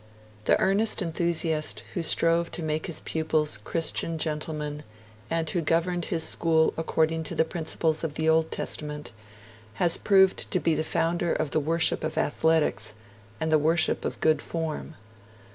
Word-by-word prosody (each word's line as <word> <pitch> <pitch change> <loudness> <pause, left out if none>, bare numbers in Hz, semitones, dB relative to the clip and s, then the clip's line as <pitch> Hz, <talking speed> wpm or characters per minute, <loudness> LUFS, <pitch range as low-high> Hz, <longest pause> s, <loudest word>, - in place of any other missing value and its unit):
The - - +3
earnest 200 +2 +2
enthusiast 165 -2 -1
who 175 - -2
strove 165 +1 +2
to 170 - -4
make 155 0 -2
his 165 - -4
pupils 155 -7 -1
Christian 165 +2 -1
gentlemen 150 -1 -3 0.5
and 165 -1 -1
who 175 +2 -1
governed 170 +2 0
his 165 -2 -1
school 160 -1 +2
according 160 0 0
to - - -4
the 160 - +2
principles 160 -1 -1
of 155 -2 -3
the 160 - -1
Old 160 0 +3
Testament, 150 -1 -3 0.6
has 175 -2 +4
proved 190 -2 +3
to 185 - +1
be 165 -1 +1
the 155 +1 0
founder 165 +1 0
of 155 -3 -1
the - - +2
worship 160 +2 +1
of - - -3
athletics 150 -10 +1 0.4
and 160 0 -1
the 155 - +5
worship 160 +3 +2
of - - -4
good 155 0 +3
form. 160 -1 -4
160 Hz, 160 wpm, -26 LUFS, 155-170 Hz, 0.6 s, the